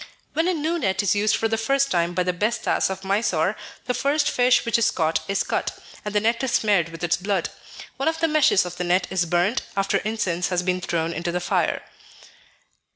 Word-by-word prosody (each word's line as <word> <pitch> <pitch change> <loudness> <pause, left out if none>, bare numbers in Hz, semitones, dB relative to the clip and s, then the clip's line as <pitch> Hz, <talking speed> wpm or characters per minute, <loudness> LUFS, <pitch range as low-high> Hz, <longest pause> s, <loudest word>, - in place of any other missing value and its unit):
When 320 +3 +1
a 370 - +2
new 320 +2 -1
net 200 -5 0
is 200 - +3
used 210 +1 +2
for 225 - 0
the 225 0 -1
first 275 +3 +1
time 175 0 0
by 180 - +2
the 180 0 -1
Besthas 215 +4 0
of 190 0 -5
Mysore, 195 -2 +1 0.3
the 250 - 0
first 290 +3 +1
fish 245 0 +3
which 230 0 +2
is 230 - +3
caught 160 -1 0
is 195 0 0
cut, - - -2 0.3
and 210 -1 -5
the - - +5
net 230 +4 0
is 260 - -1
smeared 200 -6 +2
with 165 +1 -10
its 175 - +2
blood. 195 -1 -1 0.5
One 275 - -1
of 320 0 -4
the 330 - +2
meshes 300 - +3
of 180 0 -7
the 180 - -2
net 180 +1 +2
is 180 -2 0
burnt, 175 +8 +1 0.2
after 195 0 +1
incense 185 -5 -1
has 180 -1 -1
been 180 0 -1
thrown 170 -2 -1
into 170 +1 -3
the 180 - -1
fire. 175 - 0
195 Hz, 220 wpm, -23 LUFS, 180-235 Hz, 0.5 s, the